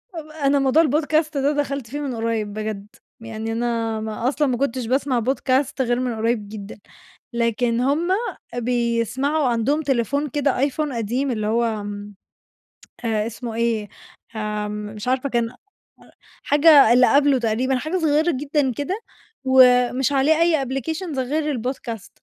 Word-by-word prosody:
آآ، 325 - -4
ب 305 - -16
أنا 285 -2 +1
موضوع 275 +5 +4
الpodcast 310 +1 +1
ده 280 +1 +1
دخلْت 275 -4 -2
فيه 290 +3 -5
من 270 -4 -3
قريّب 225 -2 -2
بجد، 215 -1 -5 0.3
يعني 225 0 -5
أنا 230 -1 -1
ما 220 +2 -3
أصلًا 290 0 0
ما 245 -2 0
كنتش 255 -2 -1
باسمع 260 0 0
podcast 265 +2 0
غير 240 0 +1
من 250 -3 -2
قريّب 220 -2 -1
جدًا، 210 -1 -9 0.5
لكن 235 0 0
هم 290 +6 +1 0.5
بيسمعوا 245 +4 0
عندهم 245 +6 +1
تليفون 280 +2 0
كده، 280 -1 0
آيفون 285 +1 -1
قديم 245 +4 -1
اللي 215 -2 -2
هو 225 -2 0
م 205 0 -7 0.9
اسمه 225 +2 -2
إيه؟ 225 -3 -1 0.5
آمم، 210 0 -4
مش 210 +3 -7
عارفة 260 +2 0
كان 235 -2 0 0.9
حاجة 290 -5 +6
اللي 250 +1 +5
قبله 280 -2 +4
تقريبًا 240 +4 0
حاجة 310 +8 -2
صغيّرة 315 +1 +2
جدًا 285 -1 0
كده 360 - -3 0.4
ومش 255 0 +4
عليه 280 +3 +3
أي 320 -5 +3
applications 285 +4 -3
غير 295 +2 -1
الpodcast، 240 -4 -5
255 Hz, 145 wpm, -22 LUFS, 225-285 Hz, 0.9 s, حاجة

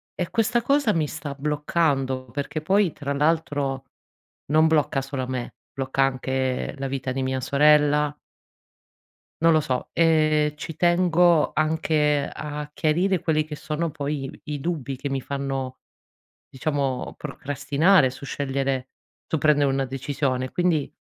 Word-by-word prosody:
E 175 - -3
questa 230 +1 +2
cosa 275 -2 +2
mi 155 -2 0
sta 150 -2 -6
bloccando, 145 -2 0
perché 145 +4 -3
poi 190 +2 +2
tra 140 -1 -4
l'altro 145 -3 0 0.6
non 155 +2 +4
blocca 150 -3 +2
solo 135 -1 -4
me, 125 -2 -4 0.2
blocca 135 0 0
anche 130 0 -1
la 135 0 -3
vita 135 -1 -3
di 135 0 -2
mia 130 0 -1
sorella 150 +1 +4 1.3
non 165 0 +6
lo 155 - +4
so, 130 -4 -3
e 155 -2 +3
ci 160 +1 -6
tengo 175 -1 +3
anche 155 -2 +1
a 150 -1 -5
chiarire 175 +4 +1
quelli 155 -2 +1
che 155 0 -7
sono 155 +3 -3
poi 145 -2 -3 0.2
i 150 -1 -3
dubbi 140 -3 -3
che 140 - -4
mi 135 -1 -2
fanno 135 -1 -4 0.7
diciamo 135 -1 -2
procrastinare 145 +3 +2
su 130 +2 -10
scegliere 135 -2 -2 0.4
su 160 - 0
prendere 145 -1 +3
una 135 0 0
decisione. 130 -1 -2
Quindi, 165 -5 0
145 Hz, 135 wpm, -24 LUFS, 135-155 Hz, 1.3 s, non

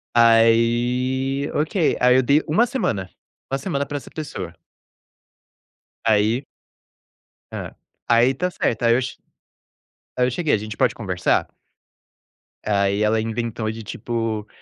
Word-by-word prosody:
Aí, 120 +4 +3
ok, 155 +3 +1
aí 125 0 +5
eu - - +5
dei 140 +4 +3
1 195 +11 +3
semana, 100 - -2 0.4
1 135 - +1
semana 140 -2 -2
pra 145 +1 -4
essa 140 - -10
pessoa. 95 - -6 1.5
Aí 110 +4 +2 1.1
Hã, - - -6 0.3
aí 120 +3 +4
tá 180 +7 -1
certo. 120 -9 -2
Aí 115 0 +5
eu - - +3
che 130 - -5 1.0
aí 125 - +3
eu - - 0
cheguei: 155 +4 0
"A - - +4
gente 105 0 -7
pode - - +2
conversar?" - - 0 1.2
Aí 100 0 +1
ela 110 +1 +2
inventou 115 0 -3
de, 110 0 -8
tipo, 115 -1 -3
120 Hz, 130 wpm, -22 LUFS, 110-135 Hz, 1.5 s, aí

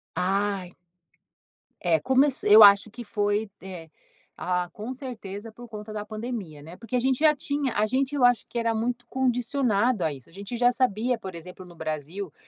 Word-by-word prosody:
Ai. 195 -1 -1 1.1
É, 165 -2 +2
começ 265 - +2
eu 210 +1 +9
acho 200 +1 +7
que 240 +3 -9
foi 205 0 -1
é, 180 -4 -9 0.5
ah, 180 -1 -2
com 215 +4 -6
certeza, 225 -5 -8
por 240 +2 -12
conta 215 -1 -8
da 210 -1 -4
pandemia, 215 -8 -6
né, 165 +4 -11
porque 230 +6 -6
a - - +3
gente 260 +1 +1
já 305 -1 +5
tinha 285 -4 -2
a 210 +1 +2
gente 265 +5 -1
eu 265 -3 +4
acho 245 -3 +3
que - - -7
era 230 -1 +1
muito 240 +2 -2
condicionado 245 -4 +1
a 160 - +1
isso. 135 -3 -11
A - - -21
gente 200 +5 -6
já 245 +1 +4
sabia, 245 -1 0
por 190 -4 -8
exemplo, 180 +3 -10
no 175 -1 -14
Brasil, 160 +3 -5
215 Hz, 190 wpm, -26 LUFS, 190-245 Hz, 1.1 s, eu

